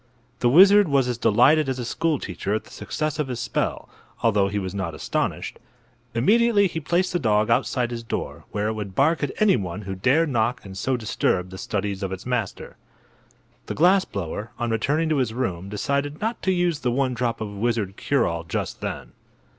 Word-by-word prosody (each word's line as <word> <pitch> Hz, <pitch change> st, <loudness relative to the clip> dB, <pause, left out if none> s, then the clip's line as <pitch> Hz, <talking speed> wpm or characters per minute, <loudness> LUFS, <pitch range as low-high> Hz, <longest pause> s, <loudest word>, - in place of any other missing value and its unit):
The 120 Hz, -, +3 dB
wizard 195 Hz, +7 st, +7 dB
was 140 Hz, -3 st, +2 dB
as 120 Hz, -2 st, -2 dB
delighted 145 Hz, +8 st, +4 dB
as 130 Hz, -, -2 dB
a 125 Hz, -, -4 dB
school 160 Hz, +5 st, 0 dB
teacher 100 Hz, -1 st, -3 dB
at 110 Hz, -, -2 dB
the -, -, -18 dB
success 155 Hz, 0 st, -3 dB
of 150 Hz, -, 0 dB
his 125 Hz, -2 st, -4 dB
spell, -, -, -2 dB, 0.4 s
although 105 Hz, -4 st, +3 dB
he 100 Hz, +1 st, -3 dB
was 95 Hz, -2 st, -3 dB
not 95 Hz, -5 st, -3 dB
astonished. -, -, -3 dB, 0.6 s
Immediately 210 Hz, -, +4 dB
he 165 Hz, -3 st, -2 dB
placed 175 Hz, +4 st, 0 dB
the 175 Hz, -, +1 dB
dog 110 Hz, -4 st, +2 dB
outside 120 Hz, +1 st, +1 dB
his 120 Hz, -1 st, -4 dB
door, 115 Hz, -, -5 dB
where 105 Hz, +1 st, -1 dB
it -, -, -1 dB
would 100 Hz, -3 st, -6 dB
bark 160 Hz, +4 st, +3 dB
at 145 Hz, -, 0 dB
anyone 105 Hz, -, +1 dB
who 95 Hz, 0 st, -5 dB
dared 135 Hz, -, +2 dB
knock 120 Hz, -2 st, 0 dB
and 95 Hz, -1 st, -9 dB
so 130 Hz, +7 st, -1 dB
disturb 95 Hz, -5 st, -1 dB
the 95 Hz, -, -8 dB
studies 100 Hz, 0 st, -3 dB
of 95 Hz, -1 st, -3 dB
its 95 Hz, -1 st, -6 dB
master. 120 Hz, -5 st, -3 dB, 0.9 s
The -, -, -4 dB
glass 185 Hz, +4 st, +5 dB
blower, 100 Hz, -, -5 dB
on 120 Hz, -1 st, -2 dB
returning 145 Hz, +8 st, +1 dB
to 155 Hz, -, +2 dB
his 120 Hz, -4 st, 0 dB
room, 95 Hz, -7 st, -3 dB
decided 140 Hz, +7 st, -2 dB
not 225 Hz, +2 st, -2 dB
to 190 Hz, -, +1 dB
use 175 Hz, -4 st, +1 dB
the 125 Hz, -4 st, -1 dB
one 130 Hz, +1 st, 0 dB
drop 120 Hz, -1 st, -1 dB
of 110 Hz, -, -4 dB
wizard 105 Hz, -2 st, -1 dB
cure 140 Hz, +1 st, +1 dB
all 85 Hz, 0 st, -2 dB
just 85 Hz, -, -4 dB
then. -, -, -5 dB
120 Hz, 200 wpm, -24 LUFS, 100-150 Hz, 0.9 s, wizard